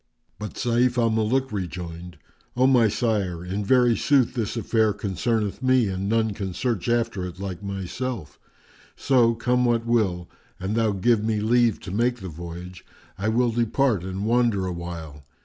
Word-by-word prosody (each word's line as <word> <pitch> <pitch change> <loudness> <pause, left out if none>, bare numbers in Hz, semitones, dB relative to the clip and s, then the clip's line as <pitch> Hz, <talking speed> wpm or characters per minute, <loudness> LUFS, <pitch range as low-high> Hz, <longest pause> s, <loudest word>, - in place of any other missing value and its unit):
But 105 - -6
Sayf 125 0 +1
al 115 -2 +3
Muluk 115 +4 +1
rejoined, 90 -3 -6 0.4
"O 130 - +4
my 125 -4 +5
sire, 100 -6 -1
in 95 +3 -3
very 120 +2 +4
sooth 135 -2 +2
this 120 -2 -2
affair 110 -2 +2
concerneth 105 +3 -2
me 130 -4 +3
and 95 +1 -3
none 110 -1 +1
can 95 -3 -5
search 115 -2 -1
after 115 -5 0
it 90 0 -10
like 95 -3 -5
myself: 100 - -5 0.6
so, 120 -4 +3
come 125 +2 +1
what 120 -1 +1
will, 100 -7 +1 0.3
an 95 +3 -3
thou 110 -1 +2
give 105 +3 +2
me 110 -1 0
leave 115 0 +2
to 95 - -7
make 120 +5 +1
the 95 - -7
voyage, 85 +2 -8 0.4
I 105 +3 0
will 120 +1 +2
depart 115 -2 +1
and 95 +2 -4
wander 115 -4 +2
awhile. 85 -5 -6
110 Hz, 165 wpm, -24 LUFS, 95-120 Hz, 0.6 s, my